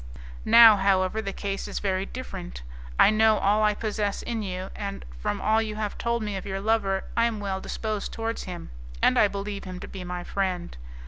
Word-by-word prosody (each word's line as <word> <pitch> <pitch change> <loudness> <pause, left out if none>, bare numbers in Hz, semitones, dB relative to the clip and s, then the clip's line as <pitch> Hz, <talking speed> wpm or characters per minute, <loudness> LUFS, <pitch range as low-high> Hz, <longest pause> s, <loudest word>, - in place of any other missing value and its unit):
Now, 225 -3 +9
however, 190 +1 +2
the 200 -2 -4
case 195 0 -4
is - - -5
very 190 -1 -1
different. 190 - -7 0.3
I - - +7
know 220 0 +4
all 205 +2 +2
I 210 -1 +3
possess 210 -2 -2
in 230 -2 -3
you, 185 -2 -5
and, 200 -1 -5
from 105 - -2
all 220 +1 +2
you 215 -1 -4
have 210 -1 -3
told 235 -1 -1
me 210 -2 -3
of 190 - -4
your 195 0 -3
lover, 200 -2 +1
I 230 - +4
am 230 -2 -1
well 195 -2 -3
disposed 215 -2 -3
towards 225 0 -3
him, 175 - -7 0.3
and - - +4
I 210 - +6
believe 200 0 -5
him 185 -1 -7
to - - -8
be 190 -2 -7
my 180 0 -5
friend. 185 -2 -2
200 Hz, 205 wpm, -26 LUFS, 190-220 Hz, 0.3 s, Now